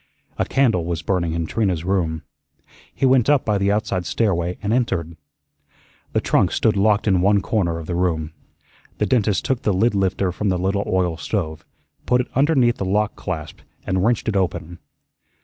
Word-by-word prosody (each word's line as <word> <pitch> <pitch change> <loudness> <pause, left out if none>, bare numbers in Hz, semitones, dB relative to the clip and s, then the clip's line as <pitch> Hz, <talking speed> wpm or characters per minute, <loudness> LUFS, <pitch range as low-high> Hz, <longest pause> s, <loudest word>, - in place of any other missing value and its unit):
A - - +2
candle 115 -11 +2
was 85 -1 -3
burning 85 -2 0
in 85 0 -2
Trina's 95 -3 -1
room. 85 -5 -1 0.7
He - - -1
went 130 -1 +4
up 145 -3 +3
by 105 -2 +1
the 100 +1 +2
outside 100 -4 -1
stairway 90 -5 0
and 105 +2 0
entered. 85 -10 -1 1.0
The - - +2
trunk - - +2
stood 110 - +1
locked 105 +2 +2
in 95 -3 +3
one 100 +2 +4
corner 90 -8 0
of 85 - -7
the 85 - -4
room. 85 -3 -1 0.7
The - - +1
dentist 105 -6 +1
took 130 -3 0
the 105 - +1
lid 105 +5 +2
lifter 95 -1 0
from 105 +3 -2
the 90 - +1
little 95 +3 0
oil 90 -3 0
stove, 80 -6 -3 0.4
put 125 0 +3
it 125 - -2
underneath 135 -4 +3
the - - -3
lock 105 +3 0
clasp 80 -5 -6 0.3
and 95 -1 0
wrenched 120 +2 +1
it 110 - 0
open. 90 -2 -2
95 Hz, 185 wpm, -21 LUFS, 85-110 Hz, 1.0 s, went